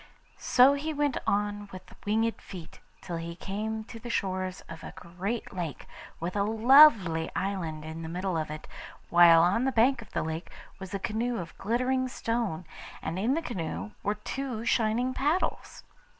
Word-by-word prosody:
So 255 +3 +6
he 300 +2 -3
went 290 -2 +1
on 205 0 0
with 185 0 -11
winged 225 +2 +1
feet 175 -5 -10 0.2
till 170 - -5
he 170 0 -6
came 215 +4 -4
to 230 +1 -10
the 240 - -8
shores 185 -3 -2
of 165 -1 -11
a - - -8
great 190 +7 -5
lake, 170 -6 -5 0.3
with 175 +3 -4
a 200 - +1
lovely 220 - +6
island 170 -6 -3
in 160 +1 -6
the 160 - -6
middle 180 +2 -2
of 155 -1 -2
it; 155 0 -7 0.4
while 170 -1 +8
on 190 +7 +2
the 265 - +2
bank 240 +1 +3
of 220 - -13
the - - 0
lake 160 +2 -4 0.3
was 190 -1 -8
a - - +1
canoe 230 +4 -2
of 170 -2 -7
glittering 255 +4 0
stone, 230 -9 -2 0.4
and 165 +3 -3
in 240 +8 +2
the 330 - -2
canoe 160 - -4
were 205 +1 0
two 235 +1 -4
shining 235 +3 +1
paddles. 300 +8 -1
205 Hz, 175 wpm, -28 LUFS, 170-240 Hz, 0.4 s, while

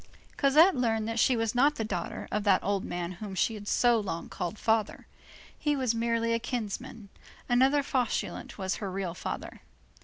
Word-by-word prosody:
Cosette 310 +7 +5
learned 225 -3 0
that 225 0 -2
she 255 - +4
was 225 -1 0
not 280 +4 +4
the 225 - -2
daughter 220 +1 -4
of 210 0 -1
that 195 -3 +3
old 200 -1 0
man 175 0 -4
whom 195 +2 -7
she 225 - +1
had 205 -1 -8
so 240 0 +3
long 185 -5 -4
called 180 +4 -4
father. 220 -1 0 0.5
He 295 -1 0
was 255 -4 +1
merely 230 0 0
a 230 - +1
kinsman; 230 -2 -5 0.4
another 265 +4 +4
Fauchelevent 255 -4 -2
was 190 -1 -2
her 200 -4 -4
real 185 -2 -3
father. - - -6
225 Hz, 180 wpm, -29 LUFS, 205-245 Hz, 0.5 s, Cosette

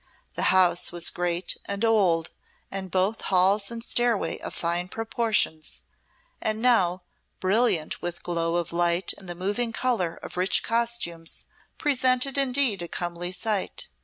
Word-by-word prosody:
The - - +1
house 185 -1 +3
was 170 -1 0
great 175 0 -1
and 200 +3 -1
old, 180 -7 +2 0.4
and 190 -1 -4
both 190 +5 0
halls 195 +2 +2
and 230 -1 -6
stairway 240 -3 +1
of - - -6
fine 175 +1 -1
proportions, 220 -7 -1 0.6
and 215 0 -1
now, 190 -7 +3 0.4
brilliant 190 -4 +1
with 175 0 -5
glow 170 -1 -1
of 170 -1 -2
light 175 +1 +1
and 190 -3 -11
the 175 - -5
moving 205 +6 -1
colour 225 -9 0
of - - -8
rich 185 +2 +4
costumes, 230 -8 -1 0.3
presented 260 -2 +2
indeed 255 -7 +2
a 170 - -4
comely 175 +1 -4
sight. 200 +1 -2
190 Hz, 140 wpm, -26 LUFS, 175-230 Hz, 0.6 s, rich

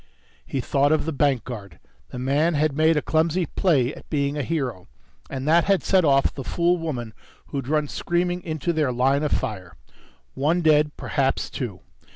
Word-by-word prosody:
He 135 - -2
thought 140 +3 +2
of 155 - +2
the 160 - -1
bank 140 -5 +1
guard. 100 -9 -8 0.3
The - - -8
man 145 +6 +1
had 150 -1 +1
made 160 +1 +3
a 150 - 0
clumsy 165 +2 +1
play 145 -9 +1
at - - -14
being 140 -1 0
a 150 - -1
hero, 130 - -3 0.4
and 135 +1 -5
that 165 +2 +4
had 195 -2 +2
set 190 -2 +3
off 135 -3 +3
the 135 - -6
fool 175 +6 +1
woman 125 -9 -4 0.4
who'd 135 -3 -4
run 150 0 +1
screaming 175 +3 -1
into 160 0 -2
their 150 -5 +1
line 135 +3 +2
of 150 - -1
fire. 95 -4 -3 0.6
One 165 +6 +1
dead. 150 -1 +3
Perhaps 135 -2 -1
two. 105 -9 -5
145 Hz, 185 wpm, -24 LUFS, 130-160 Hz, 0.6 s, that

